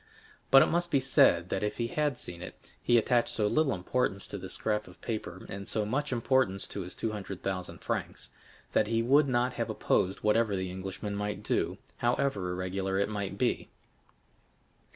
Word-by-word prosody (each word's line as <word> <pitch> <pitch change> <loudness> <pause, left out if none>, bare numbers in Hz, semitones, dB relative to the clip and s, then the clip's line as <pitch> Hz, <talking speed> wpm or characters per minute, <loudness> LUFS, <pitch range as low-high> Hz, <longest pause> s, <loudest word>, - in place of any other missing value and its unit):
But 135 - +9
it - - +4
must 175 +1 0
be 140 - +3
said 110 -9 +4
that 95 - -1
if 105 0 -2
he 115 - 0
had 150 -2 0
seen 85 -5 -5
it, - - -8 0.3
he 120 - +4
attached 120 +1 +3
so 105 - +1
little 140 +6 +2
importance 100 +1 -1
to 100 - -6
this 95 0 -7
scrap 105 -1 -1
of 90 - -15
paper, 105 -6 -5
and 100 0 -7
so 110 -1 +1
much 145 +7 -1
importance 120 -5 +1
to 100 - -4
his 90 -1 -7
two 115 - -2
hundred 100 -3 -6
thousand 95 -2 -4
francs, - - -4 0.4
that 105 - +2
he 115 +1 +1
would 140 +4 +5
not 125 0 +1
have - - -2
opposed 95 +1 0
whatever 105 -1 +2
the 95 -1 -3
Englishman 95 +2 -5
might 105 0 -3
do, - - 0 0.2
however 120 -6 0
irregular 95 +2 -2
it 100 +1 +1
might 100 -3 -3
be. - - 0
105 Hz, 190 wpm, -30 LUFS, 95-120 Hz, 0.4 s, But